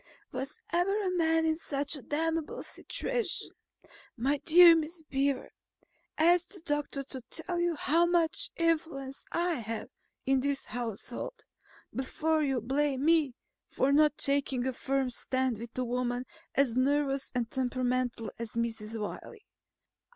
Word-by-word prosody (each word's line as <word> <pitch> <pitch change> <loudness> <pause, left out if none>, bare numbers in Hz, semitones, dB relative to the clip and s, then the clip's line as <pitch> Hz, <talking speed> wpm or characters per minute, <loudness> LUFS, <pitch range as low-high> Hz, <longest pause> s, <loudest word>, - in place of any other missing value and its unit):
Was 270 - -4
ever 390 +5 +2
a 365 -1 0
man 325 -1 +3
in 320 0 +2
such 285 -2 -1
a 285 - -8
damnable 320 +3 -2
situation? 475 -7 -2 0.7
My 270 +5 +1
dear 340 +2 +8
Miss 325 +1 -3
Beaver, 275 -2 -1 0.7
ask 345 +2 +4
the 390 - -6
doctor 295 -3 -2
to 265 -1 -6
tell 345 +2 -1
you 345 -1 +1
how 330 +4 +3
much 345 +3 +2
influence 310 -5 -1
I 340 -3 0
have 225 0 -5 0.4
in 270 0 +3
this 280 +1 -1
household, 245 - -5 0.5
before 310 +4 0
you 270 -4 +1
blame 275 +3 0
me 315 -6 +3 0.3
for 270 - +1
not 300 0 +4
taking 275 -3 +1
a 260 - 0
firm 270 0 -1
stand 260 -1 -1
with 235 +1 -8
a 255 - +1
woman 245 0 -1 0.3
as 265 -4 +3
nervous 275 +1 +1
and 235 -2 -1
temperamental 250 -3 -1
as 230 -2 -5
Mrs. 225 -1 -3
Wiley. 310 - -7
280 Hz, 140 wpm, -30 LUFS, 255-325 Hz, 0.7 s, dear